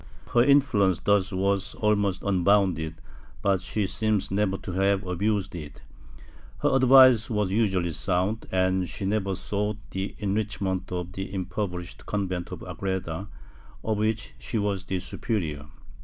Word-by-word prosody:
Her 120 - +6
influence 125 - +4
thus 100 -2 +2
was 95 0 0
almost 100 -3 +1
unbounded, 95 -4 +2 0.5
but 95 -2 +2
she 100 +2 -1
seems 105 0 0
never 95 -1 +1
to 95 - -7
have 95 +2 +1
abused 100 +2 -1
it; 75 -4 -9 0.8
her - - +3
advice 130 -3 +7
was 105 -4 0
usually 95 -5 +1
sound, 95 +6 -1
and 95 -1 +1
she 100 - -5
never 100 -1 0
sought 105 +2 -2
the 95 +1 -4
enrich 105 +1 -2
ment 95 -2 -2
of 90 -1 -3
the 95 +1 -5
impoverished 90 -1 -4
convent 95 -4 -2
of - - -7
Agreda, 95 -1 -4 0.6
of 110 -2 -1
which 110 +1 -1
she 115 - -3
was 100 -2 -1
the 95 - -2
superior. 80 - -3
100 Hz, 140 wpm, -26 LUFS, 95-105 Hz, 0.8 s, advice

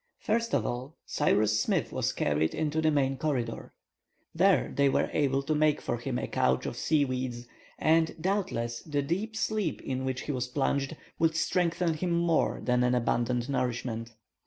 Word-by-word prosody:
First 230 +2 0
of - - +1
all, 130 +6 -4
Cyrus 110 -7 +2
Smith - - 0
was - - 0
carried 75 +2 0
into 155 0 0
the 155 - +3
main 135 -3 +1
corridor. 125 -6 -2 0.6
There 190 +3 +3
they 140 -1 +4
were - - +1
able 140 -2 +1
to 150 +3 0
make 150 -1 +3
for 120 - -2
him 125 +1 -3
a - - -2
couch 65 0 +1
of - - -3
seaweeds, 130 -5 0 0.3
and, 160 +1 +3
doubtless, 175 - -1
the 145 -3 -2
deep 195 +9 -2
sleep 215 -6 -1
in 130 -1 -3
which 130 -1 -2
he - - -3
was 125 -2 -2
plunged, 140 +2 -1 0.2
would 160 -1 +2
strengthen 170 0 +1
him 170 +3 -1
more 170 -1 +1
than 125 0 +2
an 125 0 +2
abundant 120 0 0
nourishment. 120 -3 -2
140 Hz, 170 wpm, -29 LUFS, 125-160 Hz, 0.6 s, they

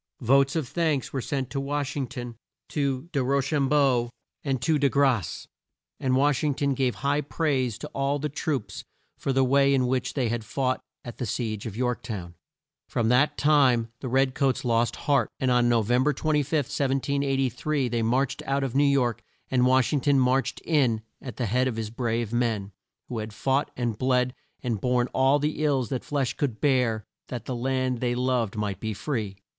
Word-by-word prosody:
Votes 135 +4 +4
of 155 -6 -1
thanks 155 -2 -1
were 135 - -1
sent 135 -1 -3
to 135 - -2
Wash 145 +1 -2
ing 135 -3 -2
ton, 120 -1 -7 0.3
to 140 0 -1
De 140 -4 0
Ro 140 +2 +2
cham 140 0 0
beau 135 -5 +3 0.3
and 135 -3 -1
De 145 0 +2
Grasse, 130 - +1 0.5
and 130 -1 +1
Wash 140 +1 +2
ing 145 -3 +1
ton 140 0 +1
gave 130 -2 0
high 145 +1 +2
praise 135 -7 -1
to - - -7
all 140 +1 0
the 150 +1 -2
troops 135 - -3 0.3
for 135 - -2
the 135 0 +3
way 140 +1 +4
in 130 -1 +2
which 125 0 -1
they 130 -4 +1
had 115 0 -2
fought 130 +3 -1 0.2
at 120 - -8
the 125 - -2
siege 110 -3 -3
of 110 -1 -7
York 125 -1 -1
town. 100 -8 -6 0.6
From 115 -1 0
that 145 +5 +3
time 135 -6 +3
the 130 - -5
red 130 +1 +2
coats 135 -2 0
lost 115 0 +2
heart, 140 -2 +3
and 130 -1 +1
on 120 -1 +3
No 115 -2 +3
vem 120 +4 +2
ber 150 +1 +2
25, 150 -3 0
1783, 135 -1 0
they 120 -1 -1
marched 125 +4 0
out 140 0 +1
of 130 -3 -2
New 140 +2 +4
York, 135 -5 +2 0.3
and 125 -1 +3
Wash 130 +1 +3
ing 145 - +1
ton 140 +1 +3
marched 130 +1 +1
in 125 -9 +2 0.2
at 130 - -8
the 125 - -1
head 125 +5 +1
of 125 - -2
his 110 -1 -4
brave 115 -1 -2
men, 115 -5 0 0.4
who 120 - -4
had 110 0 -6
fought 135 +5 0
and 120 -4 -2
bled 125 -1 +2 0.3
and 115 -6 -2
borne 125 -1 +2
all 135 +2 +4
the 150 +1 -1
ills 135 -6 +1
that 130 - -3
flesh 140 -4 -1
could 125 -7 -2
bear 125 -6 +1 0.2
that 120 -3 -6
the 130 - -3
land 130 0 -1
they 120 0 0
loved 125 -4 0
might 105 -2 -2
be 110 -2 -3
free. 110 -6 -3
130 Hz, 200 wpm, -26 LUFS, 120-140 Hz, 0.6 s, Votes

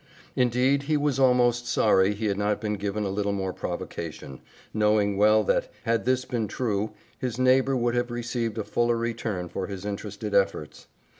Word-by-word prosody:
Indeed, 125 +3 +2
he 155 - +3
was 145 -2 0
almost 120 -2 +3
sorry 105 -3 +3
he 110 +2 -4
had 100 -2 0
not 105 0 0
been 105 -1 -2
given 105 +1 -2
a 100 - -1
little 100 0 -1
more 95 -2 -2
provocation, 75 -7 -6 0.3
knowing 105 -1 +2
well 105 +2 +4
that, - - 0
had 115 -2 0
this 130 0 +1
been 115 -3 -2
true, 105 -1 -2 0.3
his 125 -3 -3
neighbor 130 +1 +3
would 120 -1 +1
have 120 0 0
received 120 -2 -3
a 110 - -1
fuller 120 +2 +1
return 115 -6 -3
for 95 +2 -4
his 100 -1 -7
interested 105 +1 -5
efforts. 95 -6 0
110 Hz, 175 wpm, -26 LUFS, 100-120 Hz, 0.3 s, well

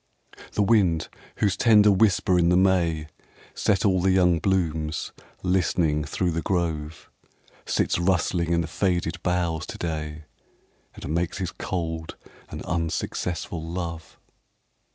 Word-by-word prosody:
The 105 - +2
wind, 95 -7 +2 0.3
whose 100 -3 +1
tender 105 -1 +5
whisper 95 -2 +3
in 85 0 +3
the 90 - +4
May 85 -5 +2 0.5
Set 100 +1 +1
all 95 -2 +3
the 95 - +2
young 90 -3 +4
blooms 80 -5 -1 0.3
listening 85 -4 +1
through 90 +4 -1
th* 85 0 -2
grove, 80 -4 -2 0.6
Sits - - +1
rustling 85 -1 +1
in 85 0 +2
the 80 - -3
faded 85 -1 -1
boughs 85 -3 -1
to - - -7
day 80 -2 -4 0.7
And 75 - -5
makes 85 +1 -1
his 90 -3 -3
cold 80 -3 -4 0.3
and - - -7
unsuccess 85 0 -2
ful 80 -2 -6
love. 85 -2 -6
85 Hz, 130 wpm, -25 LUFS, 80-95 Hz, 0.7 s, tender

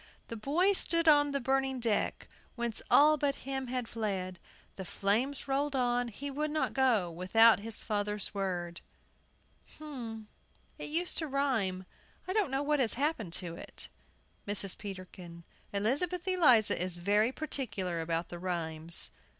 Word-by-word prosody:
"The 230 - -4
boy 320 - +2
stood 335 -3 +2
on 290 -1 +6
the 280 0 -1
burning 265 0 0
deck, 230 -3 -1 0.3
Whence 235 -2 -2
all 305 +1 +6
but 280 -1 0
him 265 -1 -3
had 250 -1 -3
fled; 190 -6 -3 0.4
The 190 - -6
flames 225 +11 -1
rolled 275 +1 0
on, 245 -1 +1
he 280 +6 -6
would 300 +3 -2
not 310 +1 -1
go 235 -10 +2
Without 205 +7 +5
his 220 +1 -2
father's 210 -1 -1
word." 175 -4 -3 1.0
But 240 -8 -7 0.6
it - - -5
used 340 +4 0
to 320 - -2
rhyme. 240 -10 0 0.4
I 370 - -1
don't 420 -7 +2
know 270 +2 -1
what 295 0 +1
has 240 -4 +3
happened 250 - -1
to 175 -2 -2
it. - - -7 0.6
MRS. 200 -2 -1
PETERKIN. 185 -3 -9 0.3
Elizabeth 290 - 0
Eliza 275 - +4
is 180 -1 -1
very 205 +6 +2
particular 215 - -3
about 165 +1 -2
the 175 - -7
rhymes. 170 -2 -2
230 Hz, 150 wpm, -31 LUFS, 190-280 Hz, 1.0 s, on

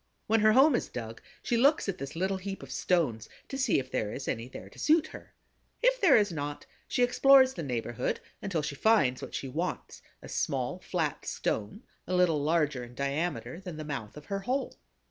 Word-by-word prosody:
When 225 +1 +3
her 215 0 +5
home 270 +5 +6
is 240 - 0
dug, 115 -2 -7 0.2
she 240 - 0
looks 280 +3 +4
at 195 -2 -3
this 140 +2 -6
little 190 +3 0
heap 195 +1 -6
of - - -10
stones 135 -12 0 0.2
to - - -5
see 265 -1 +2
if 130 -1 -3
there 105 -1 -1
is 130 - -6
any 115 +1 -2
there 130 - -10
to - - -15
suit 315 +1 +4
her. - - -12 0.5
If - - +3
there 335 -11 +7
is 205 -3 +2
not, 145 -2 -5 0.2
she 250 - +1
explores 260 +1 +6
the - - -5
neighborhood 120 -5 -2 0.2
until 170 -6 -2
she 150 - -3
finds 140 - +3
what - - -7
she 135 - -3
wants, 165 +8 -4 0.2
a - - -9
small - - -2
flat - - -2
stone 110 - -3 0.2
a 185 - 0
little 170 -5 +3
larger 150 -4 +1
in 120 0 -11
diameter 155 +5 -2
than 180 -4 -8
the 155 - -5
mouth 135 -6 -5
of 150 - -11
her 195 0 -3
hole. 255 +7 -2
170 Hz, 205 wpm, -29 LUFS, 140-225 Hz, 0.5 s, there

